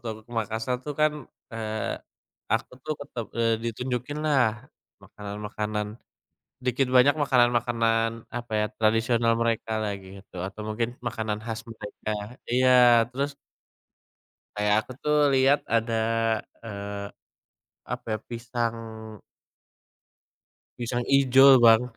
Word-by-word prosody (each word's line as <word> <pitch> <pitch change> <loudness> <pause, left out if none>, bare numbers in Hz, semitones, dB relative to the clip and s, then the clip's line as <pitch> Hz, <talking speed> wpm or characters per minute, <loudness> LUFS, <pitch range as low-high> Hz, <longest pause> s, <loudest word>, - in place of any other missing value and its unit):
waktu - - -37
aku 110 - -11
ke - - -12
Makassar 115 +3 -2
tuh 145 - -3
kan, 155 0 +4 0.4
eee, 110 -1 -3 0.6
aku 115 +2 0
tuh 155 - -1
tetep 125 -5 -6
eee, 115 -1 +3
ditunjukinlah 125 +1 -1 0.4
makanan-makanan, 105 +1 -4 0.8
dikit 125 +1 +1
banyak 135 +4 +6
makanan-makanan, 120 -3 +2 0.3
apa 120 -1 -8
ya, 105 - +2
tradisional 115 +1 +2
mereka 115 -1 0
lah 105 -1 -1
gitu, 95 0 -13
atau 105 +2 -9
mungkin, 115 +2 -1 0.2
makanan 110 -2 -3
khas 115 -1 -4
mereka 110 -1 -6 0.4
iya. 125 -2 +6
Terus 140 +3 -2 1.2
kayak 105 0 +2
aku - - -11
tuh 150 0 +2 0.2
lihat 135 +2 +4
ada, 115 0 0 0.7
eee, 100 -2 -6 0.8
apa - - -5
ya, - - -2
pisang 115 0 -3 2.0
pisang 120 0 -2
ijo 135 -1 +6
Bang. 115 0 +7
115 Hz, 110 wpm, -26 LUFS, 110-125 Hz, 2.0 s, Bang